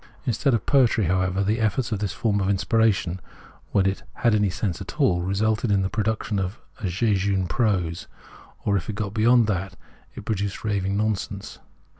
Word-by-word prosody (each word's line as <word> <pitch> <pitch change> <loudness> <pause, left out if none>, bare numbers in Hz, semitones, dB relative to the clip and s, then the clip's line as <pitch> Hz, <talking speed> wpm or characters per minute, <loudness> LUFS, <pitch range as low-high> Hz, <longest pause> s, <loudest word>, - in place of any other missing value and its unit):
Instead 125 +1 +2
of 110 - -3
poetry, 125 -5 +3
however, 95 +2 +1
the 105 +4 0
efforts 115 +3 0
of 105 - -1
this 100 -3 -2
form 100 +2 0
of 95 - 0
inspiration, 100 -3 +1 0.5
when 100 -2 +3
it 95 0 0
had 120 -2 +2
any 105 -2 +3
sense 95 -1 -3
at - - -8
all, 90 -1 +3
resulted 105 +4 0
in 100 -1 +3
the 95 - -2
production 110 -1 -1
of 95 +3 -3 0.3
jejune 95 0 +1
prose, 90 -4 0 0.6
or, 100 - +2
if 95 -1 -2
it 105 - -3
got 105 -2 -3
beyond 115 +2 +4
that, 95 -2 -2 0.4
it - - -9
produced 100 -2 -2
raving 100 -2 0
nonsense. 105 -1 -3
100 Hz, 175 wpm, -24 LUFS, 95-110 Hz, 0.6 s, beyond